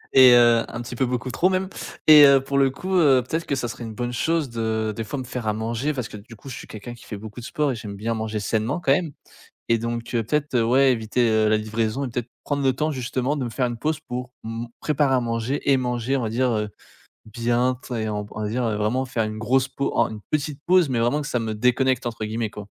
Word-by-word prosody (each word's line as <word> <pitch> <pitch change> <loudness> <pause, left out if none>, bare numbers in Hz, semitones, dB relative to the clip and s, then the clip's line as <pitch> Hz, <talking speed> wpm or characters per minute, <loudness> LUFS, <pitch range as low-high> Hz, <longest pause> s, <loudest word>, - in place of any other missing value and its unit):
et 130 -2 +8
heu, 120 -1 +5
un 120 - -5
petit 120 0 -7
peu 130 - +1
beaucoup 125 +1 -3
trop 180 +8 +2
même 190 0 0 0.4
et 150 -1 +10
heu, 135 -1 +5
pour 140 0 0
le 135 -1 +4
coup, 185 +8 -4
heu, 135 -7 +5
peut-être 160 +5 -2
que - - 0
ça 120 -3 -2
serait 120 +1 -7
une 110 - -7
bonne 120 +2 -3
chose 160 +1 0
de 110 -1 -1
des 115 - -4
fois 140 +6 -5
me 130 - -4
faire 125 -3 -5
à 105 - +1
manger 115 +7 -2
parce 125 -5 -4
que 105 - -9
du 115 +3 -13
coup 135 - -11
je 125 - -6
suis - - -10
quelqu'un 110 +3 -8
qui 120 - -15
fait 105 - -6
beaucoup 105 +3 -9
de - - -10
sport 150 -3 0
et - - -3
j'aime 105 -3 -7
bien 115 +3 -2
manger 110 -1 -3
sainement 110 - -1
quand 135 - +3
même. 155 0 0 0.6
Et 115 - +3
donc 115 +1 -4
heu, 115 -2 0
peut-être, 150 +3 -1
heu, 115 - +3
ouais, 130 +3 +4
éviter, 115 +1 +1
heu, 110 -1 +3
la 110 - +4
livraison 110 +4 -2
et 130 - -3
peut-être 120 0 -4 0.2
prendre 145 -1 -1
le 130 - +4
temps 155 +4 0
justement 130 +1 -2
de 135 - -2
me 120 - -4
faire 125 +2 0
une 120 -1 -4
pause 155 +4 -1
pour 125 -3 -6
m 115 +1 -4
préparer 145 -3 +1
à 130 - +3
manger 120 +4 -1
et 135 - +6
manger, 125 +1 -1
on 130 - -1
va 110 - -1
dire 125 +3 +1
heu, 105 -1 -1 0.6
bien. 120 +3 0
Tu - - -12
sais, 110 -3 -2
on 105 -1 -2
va 105 +1 -5
dire, 125 +3 -1
heu, 110 -2 0
vraiment 115 +5 0
faire 120 -3 -1
une 110 0 -5
grosse 130 +4 +1
pau 140 +1 -3
en 115 - +3
une 105 -1 -8
petite 150 -2 -1
pause, 180 -4 +4
mais 125 - 0
vraiment 120 +6 +1
que 140 - -5
ça 125 - -1
me 110 -1 -3
«déconnecte» 125 +3 +1
entre 115 -2 -5
guillemets 110 0 -2
quoi. 105 -1 -9
120 Hz, 275 wpm, -23 LUFS, 110-135 Hz, 0.6 s, et